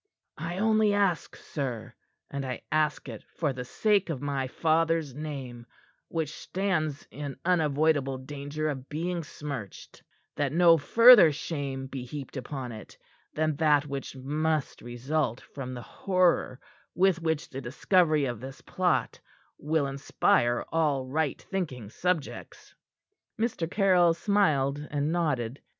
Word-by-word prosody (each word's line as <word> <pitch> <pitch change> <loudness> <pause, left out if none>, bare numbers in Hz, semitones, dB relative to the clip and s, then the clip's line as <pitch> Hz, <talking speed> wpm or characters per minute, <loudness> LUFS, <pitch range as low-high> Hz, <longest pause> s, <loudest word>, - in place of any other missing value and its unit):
"I 170 +3 -4
only 215 0 +3
ask, 195 -5 0
sir 120 -5 -5 0.4
and 140 0 -3
I 130 -3 -5
ask 155 -1 +1
it 115 -4 -8
for 150 -5 0
the 125 -1 -5
sake 200 - +1
of 155 -6 -2
my 140 -1 -2
father's 160 0 +1
name, 130 -5 -7 0.4
which 160 -2 -3
stands 165 -7 -2
in 145 -1 -6
unavoidable 150 -5 +2
danger 145 +3 -5
of 135 -2 -6
being 170 +3 -2
smirched 140 -9 -8 0.4
that 145 -1 0
no 170 -1 +6
further 225 - +8
shame 140 -3 -4
be 135 -1 -6
heaped 135 +2 -8
upon 130 -1 -5
it 110 -1 -11 0.4
than 155 -1 +1
that 150 -2 +3
which 140 -1 -6
must 150 +3 -1
result 120 +1 -2
from 130 -2 -8
the 120 - -7
horror 180 - +1 0.4
with 185 -2 +3
which 160 -2 -1
the 135 - -5
discovery 155 +4 +2
of 120 -4 -3
this 135 +3 -9
plot 180 -2 0 0.4
will 155 -1 0
inspire 135 -3 +1
all 150 -5 +1
right 145 +1 -1
thinking 130 - -5
subjects." 175 -2 -3 0.7
Mr. 215 -8 -1
Caryll 180 -4 +4
smiled 155 -8 +2
and 145 +1 -1
nodded. 140 -8 -1
150 Hz, 135 wpm, -28 LUFS, 135-165 Hz, 0.7 s, further